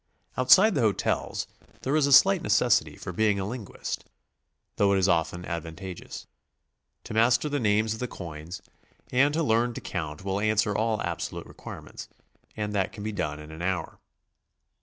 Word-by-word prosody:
Outside 190 Hz, -, +6 dB
the 140 Hz, -, +1 dB
hotels 105 Hz, -4 st, 0 dB, 0.4 s
there 135 Hz, +3 st, 0 dB
is 155 Hz, -2 st, +4 dB
slight 190 Hz, +3 st, +6 dB
necessity 80 Hz, -, +2 dB
for 90 Hz, -, -7 dB
being 105 Hz, +1 st, +2 dB
a 95 Hz, -, -2 dB
linguist, 115 Hz, -2 st, -5 dB, 0.7 s
thoug'h 100 Hz, -1 st, +3 dB
it -, -, +3 dB
is 95 Hz, 0 st, +3 dB
often 85 Hz, 0 st, 0 dB
advantageous. 85 Hz, +2 st, -6 dB, 0.8 s
To -, -, -7 dB
master 120 Hz, +6 st, +3 dB
die 145 Hz, 0 st, -1 dB
names 110 Hz, -1 st, +2 dB
of 110 Hz, -, -8 dB
the 125 Hz, -, -2 dB
coins 85 Hz, 0 st, -8 dB, 0.5 s
and 135 Hz, +3 st, +4 dB
to 165 Hz, -, +1 dB
learn 120 Hz, -2 st, +2 dB
to -, -, -5 dB
count 80 Hz, -1 st, -5 dB
will 95 Hz, 0 st, -1 dB
answer 105 Hz, -1 st, +1 dB
all 110 Hz, 0 st, +1 dB
abso 85 Hz, -1 st, -3 dB
lute -, -, -7 dB
requirements, -, -, -10 dB, 0.5 s
and 105 Hz, -1 st, -2 dB
that 95 Hz, -2 st, 0 dB
can 105 Hz, -, -8 dB
be 110 Hz, -, -2 dB
done 75 Hz, -7 st, -3 dB
in 75 Hz, 0 st, -10 dB
an 80 Hz, +1 st, -9 dB
hour. 90 Hz, -2 st, -2 dB
105 Hz, 170 wpm, -27 LUFS, 90-120 Hz, 0.8 s, Outside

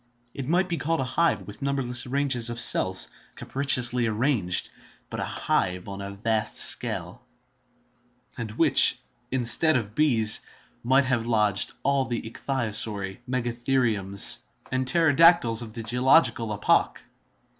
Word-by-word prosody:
It 135 Hz, -2 st, -7 dB
might 180 Hz, +4 st, +1 dB
be 170 Hz, -2 st, -3 dB
called 165 Hz, +3 st, -2 dB
a -, -, -1 dB
hive 130 Hz, -, -1 dB
with 105 Hz, +2 st, -12 dB
numberless 135 Hz, -3 st, -1 dB
ranges 130 Hz, -3 st, +1 dB
of 120 Hz, 0 st, -5 dB
cells, 95 Hz, -5 st, +2 dB, 0.3 s
capriciously 125 Hz, -3 st, +1 dB
arranged, 110 Hz, -5 st, -1 dB, 0.4 s
but -, -, -5 dB
a -, -, -2 dB
hive 90 Hz, 0 st, -2 dB
on 100 Hz, 0 st, -8 dB
a 100 Hz, -, -7 dB
vast 110 Hz, +1 st, -2 dB
scale, 90 Hz, +8 st, +1 dB, 1.1 s
and 115 Hz, -3 st, -6 dB
which, 145 Hz, -1 st, +4 dB, 0.3 s
instead 130 Hz, +5 st, +4 dB
of 105 Hz, -4 st, -3 dB
bees, 115 Hz, -6 st, +2 dB, 0.4 s
might 130 Hz, +3 st, +2 dB
have 120 Hz, -3 st, -2 dB
lodged 105 Hz, -4 st, +1 dB
all 140 Hz, -1 st, 0 dB
the 120 Hz, -3 st, -4 dB
ichthyosauri, 110 Hz, -5 st, -3 dB
megatheriums, 120 Hz, -, -1 dB, 0.3 s
and 130 Hz, 0 st, -2 dB
pterodactyles 165 Hz, -5 st, +3 dB
of 110 Hz, -2 st, -9 dB
the 115 Hz, -1 st, -7 dB
geological 125 Hz, 0 st, +2 dB
epoch. 105 Hz, -, 0 dB
120 Hz, 130 wpm, -24 LUFS, 110-135 Hz, 1.1 s, which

